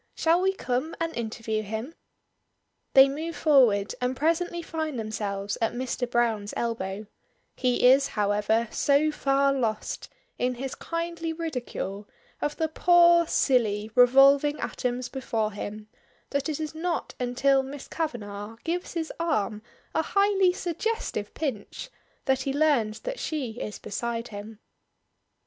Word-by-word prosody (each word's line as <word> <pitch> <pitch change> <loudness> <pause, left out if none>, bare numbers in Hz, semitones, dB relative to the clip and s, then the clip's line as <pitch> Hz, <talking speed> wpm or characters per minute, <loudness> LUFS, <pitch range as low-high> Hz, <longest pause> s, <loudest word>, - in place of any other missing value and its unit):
"Shall 335 +2 +3
we 385 +1 +2
come 260 -2 -2
and 330 0 -2
interview 220 -1 -2
him?" 220 +8 -5 1.0
They 270 0 +9
move 315 +4 -4
forward 250 -10 +4
and 250 +1 -1
presently 335 +2 0
find 315 -4 -3
themselves 205 -2 -3
at 225 0 +1
Mr. 245 0 -3
Browne's 225 -4 0
elbow; 215 -3 -3 0.5
he 250 -1 +1
is, 270 +2 +6
however, 210 +2 +1
so 290 +2 +3
far 275 -1 +2
lost 225 -5 -2 0.3
in 250 0 0
his 265 +2 -5
kindly 335 -1 -3
ridicule 250 - -5 0.3
of 295 - -2
the 320 - +1
poor 345 +1 +5
silly 220 -8 +1
revolving 275 +4 +6
atoms 250 -1 -2
before 230 -4 -2
him, 210 +1 -7 0.4
that 280 +2 -1
it 305 - -2
is 310 0 -4
not 335 +2 -2
until 265 +2 +2
Miss 270 +1 -8
Kavanagh 215 -8 -4
gives 350 +2 -3
his 325 -1 -3
arm 215 -11 0 0.3
a 320 - +2
highly 395 +1 +3
suggestive 355 - -3
pinch 275 - -4 0.3
that 265 0 +2
he 270 0 -2
learns 275 -8 +2
that - - -5
she 255 -7 -3
is 210 - -5
beside 230 +2 -4
him. 210 +2 -9
260 Hz, 135 wpm, -27 LUFS, 220-315 Hz, 1.0 s, They